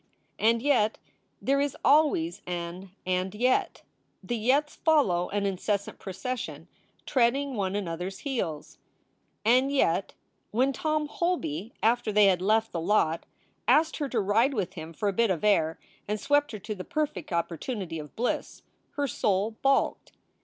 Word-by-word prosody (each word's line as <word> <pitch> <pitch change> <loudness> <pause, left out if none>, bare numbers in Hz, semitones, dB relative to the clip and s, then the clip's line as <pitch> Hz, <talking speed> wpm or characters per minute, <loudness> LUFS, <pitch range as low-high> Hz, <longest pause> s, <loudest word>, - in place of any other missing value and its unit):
And 230 +2 +3
yet 240 -7 +3 0.4
there 275 +1 +1
is 285 -1 -1
always 275 - +3
an 175 +2 -5 0.2
"and 185 +1 -1
yet." 250 +4 +1 0.4
The 240 - -2
yets 265 +7 +1
follow 205 - +2
in 205 0 -1
incessant 200 +1 -2
procession, 240 +6 -5 0.4
treading 270 +2 +2
one 195 -4 -1
another 180 -3 -3
s 190 - -7
heels. 185 - -3 0.7
And 255 +4 +4
yet, 195 -9 +1 0.3
when 260 +5 +2
Tom 305 +1 -1
Holby, 295 - -2
after 235 0 +2
they 210 0 +5
had 185 -2 +3
left 220 +3 +2
the 170 - -3
lot, 170 -3 +1 0.4
asked 320 +1 +4
her 290 -3 -2
to 240 - 0
ride 225 +7 +2
with 190 -4 -2
him 160 -3 -7
for 205 +5 -3
a 200 - +1
bit 230 +3 +2
of 180 -2 -1
air, 165 -6 +3 0.3
and 210 +1 -1
swept 290 +5 +2
her - - -3
to 215 +2 -5
the 185 -3 -7
perfect 305 - -3
opportunity 170 - -3
of 150 -1 -10
bliss, 240 +2 -2 0.3
her 285 - -1
soul 205 -3 0
balked. 275 0 +1
215 Hz, 155 wpm, -28 LUFS, 185-270 Hz, 0.7 s, they